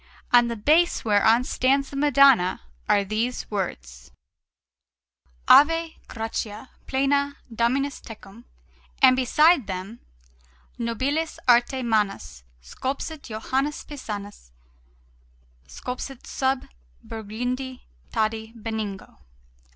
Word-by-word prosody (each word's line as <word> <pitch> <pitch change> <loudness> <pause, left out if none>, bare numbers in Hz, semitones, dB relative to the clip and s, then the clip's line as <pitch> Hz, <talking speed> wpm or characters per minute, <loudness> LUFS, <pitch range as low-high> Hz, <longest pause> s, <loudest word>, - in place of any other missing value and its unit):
On 240 -1 +6
the 235 - -3
base 310 +11 +2
whereon 220 +3 +4
stands 270 +2 +1
the - - -8
Madonna 275 -9 +4 0.3
are 200 - +4
these 220 +5 -2
words: - - -5 1.4
AVE 330 +2 +6 0.2
GRATIA 225 0 -5 0.2
PLENA, 280 +1 +1 0.2
DOMINUS 260 +5 0
TECUM; 225 0 -13 0.6
and 255 -1 +8
beside 280 - +4
them: 190 +4 -6 0.8
NOBILIS 270 +8 -2
ARTE 245 +2 +3
MANUS 205 - -1 0.2
SCULPSIT 275 - -5
JOHANNES 265 +6 -2
PISANUS 205 - -8 1.2
SCULPSIT 250 - -7
SUB 265 0 -1 0.4
BURGUNDIO 245 +4 -5 0.3
TADI 220 0 -2
BENIGNO.... 215 -3 -6
240 Hz, 90 wpm, -24 LUFS, 215-275 Hz, 1.4 s, and